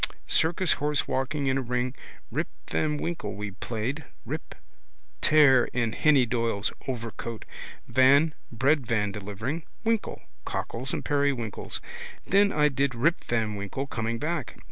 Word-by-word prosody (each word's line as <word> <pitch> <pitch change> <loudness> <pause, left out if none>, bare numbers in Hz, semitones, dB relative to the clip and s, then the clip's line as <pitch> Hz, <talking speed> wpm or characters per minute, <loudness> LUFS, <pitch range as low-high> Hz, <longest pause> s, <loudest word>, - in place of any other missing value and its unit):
Circus 165 +2 +3
horse 150 0 +1
walking 135 +2 -1
in 135 0 +2
a - - -1
ring. 125 0 -1 0.4
Rip - - -1 0.2
van 150 -1 +1
Winkle 145 - -3
we 105 0 -4
played. 120 +9 -4 0.2
Rip: - - -5 0.7
tear 135 -5 +6
in 120 -2 0
Henny 145 -5 +4
Doyle's 115 -3 0
overcoat. 115 -2 -5 0.4
Van: 140 +5 +5 0.2
breadvan 115 -5 +2
delivering. 105 - -4 0.2
Winkle: 225 -1 -1 0.2
cockles 130 - -3
and - - -3
periwinkles. 140 -7 -1 0.4
Then 200 +1 +4
I 150 0 +4
did 140 -2 0
Rip 155 +9 +2
van 110 -3 0
Winkle 100 +7 -4
coming 115 -3 -2
back. 155 +1 -3
130 Hz, 130 wpm, -27 LUFS, 115-150 Hz, 0.7 s, tear